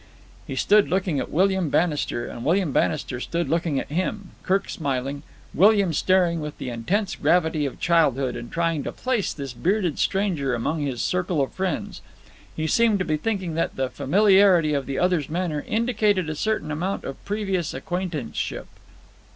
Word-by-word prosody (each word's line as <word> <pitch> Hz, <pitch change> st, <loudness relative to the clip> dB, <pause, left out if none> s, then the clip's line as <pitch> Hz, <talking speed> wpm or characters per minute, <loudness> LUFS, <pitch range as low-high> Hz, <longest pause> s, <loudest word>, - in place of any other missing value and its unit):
He 135 Hz, -, -4 dB
stood 205 Hz, +9 st, +4 dB
looking 180 Hz, -6 st, 0 dB
at -, -, -4 dB
William 190 Hz, 0 st, +2 dB
Bannister, 150 Hz, -7 st, 0 dB
and 120 Hz, -, -7 dB
William 170 Hz, +2 st, +1 dB
Bannister 135 Hz, -3 st, 0 dB
stood 170 Hz, +4 st, -2 dB
looking 165 Hz, -2 st, 0 dB
at -, -, -7 dB
him, 185 Hz, +4 st, -2 dB
Kirk 195 Hz, +1 st, 0 dB
smiling, 140 Hz, -2 st, -3 dB, 0.3 s
William 200 Hz, -1 st, +4 dB
staring 175 Hz, 0 st, +2 dB
with 150 Hz, -1 st, -6 dB
the 125 Hz, -, -5 dB
intense 180 Hz, -, -1 dB
gravity 160 Hz, -4 st, +2 dB
of 135 Hz, -, -8 dB
childhood 140 Hz, -7 st, +2 dB
and 120 Hz, 0 st, -7 dB
trying 165 Hz, -3 st, 0 dB
to -, -, -3 dB
place 250 Hz, -6 st, -1 dB
this 140 Hz, -4 st, -6 dB
bearded 180 Hz, -, 0 dB
stranger 175 Hz, -10 st, 0 dB
among 150 Hz, +7 st, -2 dB
his 135 Hz, -4 st, -2 dB
circle 180 Hz, -3 st, 0 dB
of 135 Hz, -, -1 dB
friends. 185 Hz, -4 st, -3 dB, 0.5 s
He 160 Hz, -, -2 dB
seemed 225 Hz, +5 st, +3 dB
to 185 Hz, -, -2 dB
be 155 Hz, -, 0 dB
thinking 190 Hz, -2 st, -2 dB
that 165 Hz, -, -1 dB
the 130 Hz, -1 st, -2 dB
familiarity 190 Hz, +1 st, +4 dB
of 140 Hz, -2 st, -1 dB
the 135 Hz, -1 st, -3 dB
other's 180 Hz, -5 st, +1 dB
manner 160 Hz, -3 st, -2 dB
indicated 210 Hz, -6 st, +1 dB
a -, -, -4 dB
certain 210 Hz, -4 st, -1 dB
amount 180 Hz, +6 st, -2 dB
of 135 Hz, -, -7 dB
previous 195 Hz, -5 st, -2 dB
acquaintanceship. 175 Hz, -8 st, -4 dB
170 Hz, 165 wpm, -24 LUFS, 145-190 Hz, 0.5 s, stood